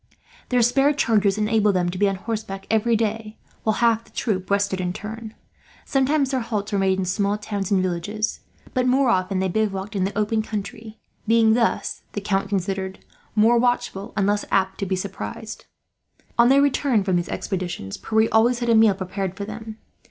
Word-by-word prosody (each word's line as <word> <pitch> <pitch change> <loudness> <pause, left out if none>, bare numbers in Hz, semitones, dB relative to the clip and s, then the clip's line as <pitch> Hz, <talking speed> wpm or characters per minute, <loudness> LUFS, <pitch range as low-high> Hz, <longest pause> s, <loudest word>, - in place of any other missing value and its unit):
Their 245 -2 +3
spare 270 +5 +3
chargers 210 -7 +2
enabled 210 -1 +2
them 175 -1 +1
to 180 - -5
be 205 -1 +4
on 195 - -2
horseback 200 -1 -5
every 225 +1 +3
day, 220 0 -2 0.2
while 220 -1 +1
half 230 -1 +3
the - - -22
troop 190 -5 -2
rested 200 -1 +1
in 180 -1 -2
turn. 220 +2 -7 0.5
Sometimes 275 +1 +1
their 260 - +1
halts 215 -4 -3
were 200 - +1
made 190 -1 +2
in 190 - -1
small 200 +3 0
towns 205 -2 -4
and 190 -2 +2
villages, 195 +5 -2 0.3
but 255 -1 +1
more 260 0 +3
often 185 -2 +1
they 190 0 +1
bivouacked 200 0 -2
in 190 - +1
the 195 +2 -2
open 215 +1 +1
country; 215 +1 -6 0.3
being 225 0 +5
thus, 230 0 0
the 205 - -3
Count 195 0 -1
considered, 190 -1 -3 0.3
more 225 +2 +5
watchful 240 -3 -1
and 195 - +2
less 205 +1 +1
apt 190 -1 +1
to 195 - -2
be 190 - 0
surprised. 195 - -6 0.7
On 235 +1 +5
their 275 +1 +5
return 270 -6 +2
from 190 -2 0
these 175 0 -1
expeditions, 180 - -4
Pierre 220 0 +1
always 230 +2 +4
had 240 -1 -2
a - - +5
meal 220 -3 +5
prepared 190 0 -4
for 200 - -4
them. 220 +1 -8
210 Hz, 190 wpm, -23 LUFS, 195-225 Hz, 0.7 s, being